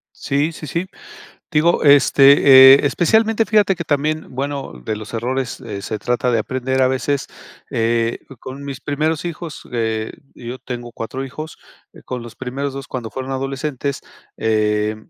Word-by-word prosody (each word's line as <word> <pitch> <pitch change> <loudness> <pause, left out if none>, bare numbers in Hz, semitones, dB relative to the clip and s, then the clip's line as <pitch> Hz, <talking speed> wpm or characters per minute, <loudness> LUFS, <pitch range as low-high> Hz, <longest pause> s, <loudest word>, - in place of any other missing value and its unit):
Sí, 145 +4 -1
sí, 155 - -9
sí. 170 +5 -2 0.7
Digo, 160 +2 +2
este, 140 -2 +8
eh, 140 - +6
especialmente 220 +8 +2
fíjate 205 -3 +3
que 170 - -5
también, 150 0 -1
bueno, 135 - -4
de 110 - -2
los 110 +1 -9
errores, 125 +2 -3
eh, 100 -1 -6
se 110 -2 -4
trata 125 +2 0
de 115 - +2
aprender 130 +3 -1
a 130 - +5
veces, 135 +2 -1 0.4
eh, 115 0 0 0.2
con 135 +2 -8
mis 135 -1 -6
primeros 155 +2 -1
hijos, 170 -2 -6
eh, 110 -2 -2 0.2
yo 120 +1 -7
tengo 120 -1 -7
4 125 +4 -5
hijos, 155 +4 -8 0.4
eh, - - -15
con 125 -2 -5
los 115 -1 -11
primeros 135 +2 -4
2 135 -1 -7
cuando 120 -4 -5
fueron 130 0 -5
adolescentes, 135 +1 -3 0.4
eh, 105 -1 +1
135 Hz, 160 wpm, -19 LUFS, 120-145 Hz, 0.7 s, este